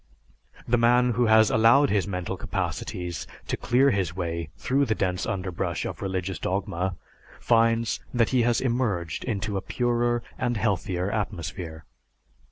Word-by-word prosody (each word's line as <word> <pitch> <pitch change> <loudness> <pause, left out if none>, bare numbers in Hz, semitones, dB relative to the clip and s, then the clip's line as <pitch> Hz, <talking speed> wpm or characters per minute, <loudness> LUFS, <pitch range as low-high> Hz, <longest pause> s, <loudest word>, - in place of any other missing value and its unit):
The 120 0 +2
man 125 +1 +4
who 120 +1 +2
has 110 0 +5
allowed 115 +6 +5
his 100 -1 +1
mental 90 -3 -3
capacities 90 -2 -4 0.2
to - - 0
clear 135 +3 +3
his 95 -5 -1
way 85 -3 -3
through 135 +6 +1
the 110 -3 0
dense 90 -3 -1
underbrush 90 -3 -2
of - - -5
religious 95 -1 -3
dogma 95 -1 -2 0.4
finds 115 0 +2
that 120 -3 +2
he 130 -2 +3
has 120 0 +2
emerged 115 -10 -1
into 105 -3 -2
a - - -2
purer 120 +1 0 0.2
and 120 -2 0
healthier 95 -3 -1
atmosphere. 85 -6 -4
105 Hz, 145 wpm, -26 LUFS, 90-120 Hz, 0.4 s, has